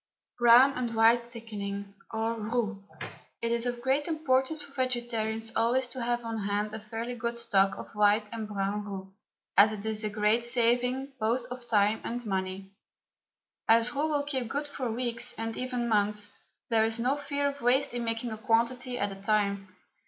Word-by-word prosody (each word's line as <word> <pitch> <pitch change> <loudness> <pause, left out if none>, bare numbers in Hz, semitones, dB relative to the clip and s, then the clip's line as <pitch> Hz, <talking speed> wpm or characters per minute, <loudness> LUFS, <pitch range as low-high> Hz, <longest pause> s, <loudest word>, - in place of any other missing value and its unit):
BROWN 240 +3 +7
AND 240 -3 -3
WHITE 230 +1 +4
THICKENING, 200 -4 -6 0.2
OR 225 +1 -1
ROUX. 220 -1 -2 0.6
It 230 - -1
is 235 +1 +1
of 240 -1 -3
great 270 +3 +1
importance 300 -2 +1
for 285 - -13
vegetarians 235 -4 -1
always 240 +3 +2
to 255 - -6
have 240 0 -1
on 225 -1 -3
hand 205 +1 -1
a 220 - -4
fairly 225 +3 -5
good 235 0 -3
stock 195 -4 +2
of - - -9
white 210 +1 +3
and 225 -2 -4
brown 205 0 -2
roux, 195 -1 -7 0.4
as 205 +2 +7
it 210 0 -7
is 220 0 0
a 215 - 0
great 210 +2 +2
saving 245 +3 +1
both 235 +3 0
of 250 -1 -7
time 210 0 +3
and 240 +1 -4
money. 190 -1 -3 1.0
As 230 +2 +4
roux 290 +3 0
will 290 -2 +1
keep 265 -4 -2
good 290 +3 -2
for 265 -4 -4
weeks, 240 0 -2
and 225 0 -3
even 250 -2 -2
months, 210 -1 0 0.4
there 225 -1 +4
is 225 +1 +1
no 255 +4 +2
fear 285 0 -1
of 280 0 -4
waste 245 +1 +3
in 240 -1 -2
making 230 +1 -2
a 220 - -6
quantity 245 +2 +1
at 205 -3 -1
a 195 0 -9
time. 200 -1 +1
230 Hz, 180 wpm, -29 LUFS, 215-245 Hz, 1.0 s, BROWN